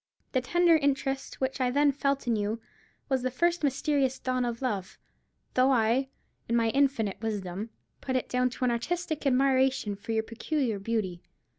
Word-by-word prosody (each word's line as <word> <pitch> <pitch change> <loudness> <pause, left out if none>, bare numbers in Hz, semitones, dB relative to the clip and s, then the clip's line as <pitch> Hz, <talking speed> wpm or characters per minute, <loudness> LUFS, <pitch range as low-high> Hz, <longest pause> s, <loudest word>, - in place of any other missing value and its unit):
The 255 - +1
tender 345 +5 +4
interest 275 -2 -1
which 265 0 -1
I 250 - +3
then 285 +3 +3
felt 275 0 -1
in 235 -2 +2
you 210 +2 -1 0.5
was 265 -3 +1
the 255 - 0
first 340 +6 +1
mysterious 275 -1 +1
dawn 255 -1 -1
of 235 +1 -4
love, 200 -7 -2 0.6
though 255 +1 +4
I, 245 +2 +2 0.4
in 235 - +2
my 230 -1 +3
infinite 225 -8 +1
wisdom, 205 -1 -3 0.3
put 260 - -2
it 255 - 0
down 250 0 +1
to 250 +1 -3
an 245 - +3
artistic 315 +5 -2
admiration 265 -4 +2
for 205 +3 -7
your 220 0 +1
peculiar 230 -1 -2
beauty. 195 -4 -2
255 Hz, 170 wpm, -28 LUFS, 225-275 Hz, 0.6 s, tender